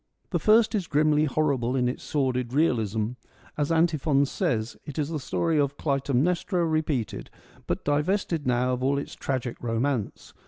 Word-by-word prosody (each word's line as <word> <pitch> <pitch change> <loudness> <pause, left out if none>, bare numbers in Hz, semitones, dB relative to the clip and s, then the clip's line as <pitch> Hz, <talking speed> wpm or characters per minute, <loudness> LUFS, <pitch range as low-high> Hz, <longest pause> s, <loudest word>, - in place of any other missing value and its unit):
The - - +1
first 220 +1 +4
is 195 -6 -1
grimly 150 0 +3
horrible 135 -5 0
in 125 -2 +2
its 125 - -3
sordid 130 -4 -1
realism; 110 -8 +1 0.5
as 150 +1 -1
Antiphon 155 -4 +3
says, 115 -4 -1
it 145 - -8
is 150 -1 -1
the 160 -2 -3
story 160 +3 0
of 140 0 0
Clytemnestra 155 +6 0
repeated, 155 -7 -1 0.4
but - - -2
divested 150 +1 0
now 125 +1 +2
of 125 - -3
all 140 +1 +2
its 140 - -5
tragic 130 -3 -3
romance. 120 0 -2
140 Hz, 155 wpm, -26 LUFS, 125-155 Hz, 0.5 s, first